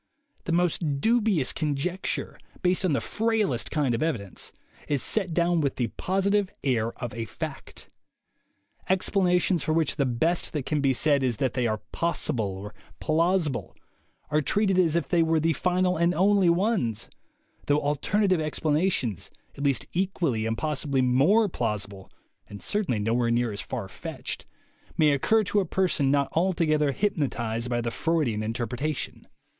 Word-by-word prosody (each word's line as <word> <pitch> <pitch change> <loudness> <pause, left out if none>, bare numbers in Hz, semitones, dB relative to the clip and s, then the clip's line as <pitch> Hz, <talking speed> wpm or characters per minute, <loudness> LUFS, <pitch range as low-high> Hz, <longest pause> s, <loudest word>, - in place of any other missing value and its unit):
The - - -2
most 165 -4 +1
dubious 220 - +2
conjecture, 155 +5 -2 0.2
based 180 +1 +2
on 180 -5 +2
the 140 - +2
frailest 215 - 0
kind 145 -5 0
of 115 - -1
evidence, 115 - -3 0.4
is 145 -3 +1
set 195 -5 0
down 170 0 +2
with 140 -3 0
the 120 -3 -1
positive 195 - 0
air 115 -4 +1
of 120 -4 -6
a 115 0 -4
fact. - - -7 1.0
Explanations 185 -2 +2
for 155 - 0
which 160 -2 +1
the 140 -3 +2
best 160 +9 0
that 145 -4 -2
can 150 -2 0
be 135 -1 +3
said 145 0 +3
is 125 -4 0
that 130 0 0
they 125 -2 0
are 110 -1 -2
possible 155 -9 0
or 105 +2 -8 0.3
plausible 155 - 0 0.6
are 150 +1 +3
treated 195 +4 +2
as 165 -3 +3
if 170 - 0
they 175 -2 +3
were 160 0 +2
the 165 +1 +2
final 180 +3 +1
and 170 +2 +2
only 195 -1 +4
ones; 175 - 0 0.6
though 145 +1 +3
alterna 150 +8 0
tive 185 -4 +2
explanations, 155 - 0 0.3
at 140 - -6
least 140 -2 +2
equally 170 - 0
and 115 0 -1
possibly 145 -2 0
more 145 - +4
plausible, 105 - -3 0.4
and 100 -2 -9
certainly 205 - 0
nowhere 115 +3 +1
near 120 -1 +1
as 100 - -4
far 115 -7 -5
fetched, - - -6 0.5
may 155 -2 +5
occur 215 +11 +3
to 205 +1 +1
a - - +2
person 180 -6 +1
not 140 0 +2
altogether 160 -4 +2
hypnotized 125 - -1
by 120 -1 0
the 115 0 -2
Freudian 150 -11 0
interpretation. 125 +6 -3
150 Hz, 160 wpm, -26 LUFS, 125-180 Hz, 1.0 s, may